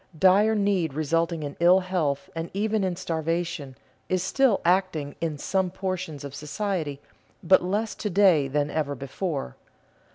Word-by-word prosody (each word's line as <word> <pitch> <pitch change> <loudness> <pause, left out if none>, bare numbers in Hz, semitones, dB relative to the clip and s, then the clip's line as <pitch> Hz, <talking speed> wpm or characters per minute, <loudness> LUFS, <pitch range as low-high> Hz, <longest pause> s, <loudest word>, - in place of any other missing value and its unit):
Dire 200 +5 +5
need 195 -8 +1
resulting 165 +1 0
in 145 -1 -5
ill 180 +2 +6
health 170 -7 -1
and 165 +1 -4
even 215 0 0
in 185 -2 -1
starvation, 165 -4 -3 0.3
is 185 -1 +1
still 255 +1 +2
acting 175 -5 +1
in 160 -3 -2
some 190 +5 0
portions 185 -5 -4
of 140 -1 -7
society, 150 -1 -3 0.4
but 190 +2 +5
less 205 +5 -1
to 210 - -4
day 180 -7 +4
than 145 +1 -1
ever 145 -3 -1
before. 140 - -4
170 Hz, 150 wpm, -26 LUFS, 150-190 Hz, 0.4 s, ill